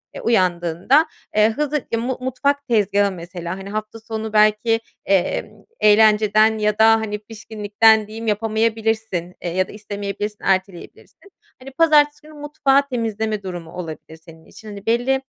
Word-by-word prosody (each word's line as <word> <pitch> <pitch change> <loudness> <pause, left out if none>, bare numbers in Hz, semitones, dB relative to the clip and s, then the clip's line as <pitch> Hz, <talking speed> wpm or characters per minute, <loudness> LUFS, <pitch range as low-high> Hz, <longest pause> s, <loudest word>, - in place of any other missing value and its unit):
eee, - - -7
uyandığında, 185 - +2 0.3
eee, 215 +1 +5
hızlıca 290 -1 -2
mu 245 +2 -2
muttfak 280 +3 -1
tezgâhı 205 -3 +2
mesela, 175 0 -7
hani, 195 +1 -9
hafta 215 +2 -5
sonu 220 -1 -6
belki, 215 +2 +3 0.3
emm, 195 -2 -1 0.2
eğlenceden 215 0 +4
ya 210 -1 0
da, 220 - +7
hani, 210 -1 -4
pişkinlikten 215 0 +1
diyeyim 225 +1 -7
yapamayabilirsin, 220 -4 -1
eee, 175 - -2
ya 185 +2 0
da - - -12
istemeyebilirsin, 205 0 -6
erteleyebilirsin. 190 - -4 0.3
Hani, 265 +1 -11
pazartesi 295 -1 +3
günü 310 - -14
mutfağı 280 -1 +1
temizleme 220 -4 -2
durumu 175 -3 -7
olabilir 160 -2 -8
senin 160 0 -17
için. 220 - -15
Hani, 200 -1 -9
belli 245 +4 +1
215 Hz, 140 wpm, -20 LUFS, 200-230 Hz, 0.3 s, da